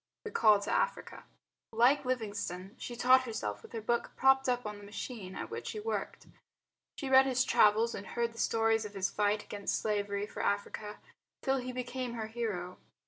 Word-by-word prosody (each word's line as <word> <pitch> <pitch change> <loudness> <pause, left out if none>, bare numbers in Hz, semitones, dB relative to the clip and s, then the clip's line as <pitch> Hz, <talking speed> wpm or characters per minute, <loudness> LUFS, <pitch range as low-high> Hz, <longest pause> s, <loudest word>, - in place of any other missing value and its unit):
The 440 - -6
Call 215 - +5
to 200 - -2
Africa 485 - -1 0.5
Like 250 +5 +4
Livingstone, 205 -6 -3
she 240 - -6
taught 255 +2 +5
herself 105 - -4
with - - -14
her 225 - -4
book 235 +2 -1
propped 265 0 +4
up 245 -1 0
on 210 -1 -5
the - - -13
machine 205 -2 -7
at - - -6
which - - -5
she 430 - -4
worked. 450 +2 -4 0.7
She 275 - -4
read 265 0 +6
his 255 -1 +2
travels 220 +2 +4
and 200 - -7
heard 235 -1 -2
the 230 - -11
stories 225 0 +2
of 210 -1 -8
his 195 0 -1
fight 210 0 +1
against 205 -1 -2
slavery 205 -1 -1
for - - -6
Africa, 210 +1 -2 0.5
till 270 -1 +2
he 255 0 -4
became 250 -1 -4
her 225 -1 -3
hero. 215 -6 -4
225 Hz, 190 wpm, -32 LUFS, 205-250 Hz, 0.7 s, read